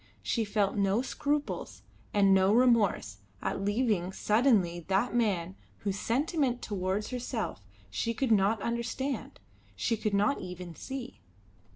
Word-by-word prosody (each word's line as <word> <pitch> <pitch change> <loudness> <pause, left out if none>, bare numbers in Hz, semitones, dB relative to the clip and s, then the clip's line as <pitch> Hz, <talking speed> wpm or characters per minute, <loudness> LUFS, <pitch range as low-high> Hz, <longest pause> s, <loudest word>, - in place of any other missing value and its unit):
She 225 - 0
felt 205 -1 +1
no 200 +4 +2
scruples 290 +2 -2 0.3
and 195 -1 +5
no 190 +1 +4
remorse 230 - +3 0.2
at - - -2
leaving 205 -3 +1
suddenly 210 -5 +2
that 195 +6 +1
man 190 -7 0 0.3
whose 200 -1 -2
sentiment 270 0 0
towards 195 +1 -2
herself 245 - -3 0.3
she 230 - -1
could 255 +1 0
not 210 +1 +4
understand, 235 +4 -3 0.4
she 230 - 0
could 215 -2 -1
not 210 +7 +2
even 180 -1 -7
see. 265 - -7
215 Hz, 130 wpm, -30 LUFS, 195-240 Hz, 0.4 s, and